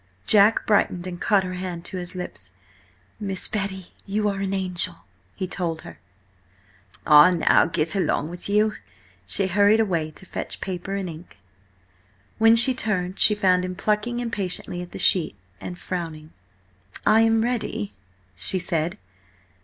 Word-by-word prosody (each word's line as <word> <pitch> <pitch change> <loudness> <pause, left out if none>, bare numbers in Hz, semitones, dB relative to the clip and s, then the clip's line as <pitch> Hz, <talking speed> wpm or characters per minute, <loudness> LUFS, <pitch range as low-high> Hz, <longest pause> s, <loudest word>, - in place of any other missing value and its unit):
Jack 210 +1 +5
brightened, 185 -4 +1
and 180 -1 -7
caught 200 -2 +3
her 185 0 -5
hand 180 -2 -6
to 190 - -5
his 175 +1 -7
lips. 105 - -7 0.7
"Miss 195 -3 0
Betty, 190 -3 -3 0.2
you 210 +1 0
are 195 -1 -3
an 195 -1 -2
angel!" 180 -2 -2 0.3
he 185 - -3
told 170 -3 -3
her. 80 -2 -12 1.1
"Ah 150 +3 +8
now, 175 -3 +3
get 165 +2 +1
along 180 -5 0
with 175 +3 -8
you!" 210 +1 +2 0.5
She 195 - 0
hurried 205 +3 +3
away 170 -8 0
to 155 +5 -11
fetch - - -6
paper 190 +1 -4
and 195 -2 -3
ink. 165 +1 -11 1.0
When 225 +1 +6
she 240 +3 +7
returned 195 -7 -2
she 210 - +7
found 185 -3 +2
him 185 0 -4
plucking 210 +5 -1
impatiently 195 -6 -3
at 180 - -9
the - - -8
sheet, 170 - +2 0.2
and 180 - -7
frowning. 165 -4 -6 0.7
"I 220 - +5
am 225 0 +3
ready," 230 - -3 0.4
she 140 - -2
said. 170 -2 -2
185 Hz, 155 wpm, -23 LUFS, 175-205 Hz, 1.1 s, Ah